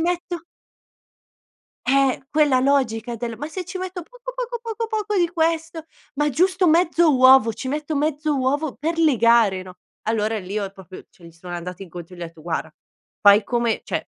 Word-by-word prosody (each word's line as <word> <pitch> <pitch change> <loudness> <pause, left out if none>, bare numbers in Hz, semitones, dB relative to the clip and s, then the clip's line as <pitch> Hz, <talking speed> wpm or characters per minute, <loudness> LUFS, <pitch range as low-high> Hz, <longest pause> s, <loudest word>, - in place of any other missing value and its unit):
metto" 350 0 -2 1.4
Eh, 270 0 +2
quella 295 -4 +3
logica 245 -4 0
del: 230 -1 -5
"Ma 295 - -4
se 365 +2 -5
ci 370 +2 -6
metto 370 -1 -5
poco, - - -10
poco, - - -4
poco, 455 0 -4
poco 425 -2 -2
di 345 -2 +3
questo, 325 -1 -1 0.3
ma 295 +1 +1
giusto 365 +6 +2
mezzo 330 -2 +4
uovo, 255 -3 +6
ci 260 - -6
metto 300 +2 -3
mezzo 300 0 0
uovo 275 +3 0
per 330 +3 -2
legare, 230 - +4
no?" 185 -1 -12 0.3
Allora, 220 0 0
lì 200 +2 -4
ho 200 -2 -3
proprio 190 -2 -12
cioè 175 - -20
gli 165 - -12
sono 175 +1 -9
andata 180 +2 -6
incontro 175 -1 -10
e - - -14
gli 175 - -8
ho - - -2
etto: 165 -1 -12
"Guarda, 160 -2 -3 0.5
fai 205 +1 +7
come 235 -2 0
cioè - - -3
275 Hz, 180 wpm, -22 LUFS, 215-335 Hz, 1.4 s, fai